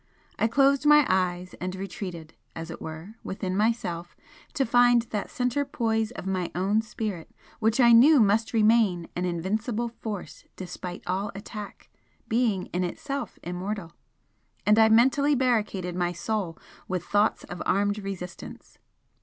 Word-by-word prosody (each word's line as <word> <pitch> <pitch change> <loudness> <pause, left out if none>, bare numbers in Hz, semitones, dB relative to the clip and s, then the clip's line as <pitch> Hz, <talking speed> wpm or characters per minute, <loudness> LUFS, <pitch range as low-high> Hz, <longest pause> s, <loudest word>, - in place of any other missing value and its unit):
I - - +3
closed 275 +4 +3
my 295 -1 +7
eyes 180 -1 0
and 185 +1 -3
retreated, 185 -4 -7 0.2
as 165 +1 -6
it - - -9
were, 160 +6 -7
within 190 -1 -3
myself 195 -5 -1 0.4
to 275 -3 +2
find 245 0 +5
that 210 -3 -4
centre 250 +3 0
poise 225 -4 -1
of 240 - -8
my 185 -2 -1
own 195 +4 +2
spirit 215 -5 -5 0.3
which 225 +2 +1
I 240 -2 +7
knew 270 +6 +7
must 220 +1 +3
remain 215 -6 +3
an 180 - -1
invincible 215 +7 -2
force 220 -4 -7
despite 180 -1 -7
all 195 +3 -2
attack, 205 +1 -8 0.4
being 225 -5 +1
in 180 +1 0
itself 265 +8 -4
immortal, 180 0 -4 0.7
and 210 +1 +5
I 220 0 +6
mentally 265 +6 +4
barricaded 210 -8 0
my 175 -1 0
soul 175 -1 -3 0.3
with 180 -2 -3
thoughts 205 +1 +1
of 175 - -8
armed 205 +1 +1
resistance. 190 -3 -8
205 Hz, 145 wpm, -26 LUFS, 180-230 Hz, 0.7 s, my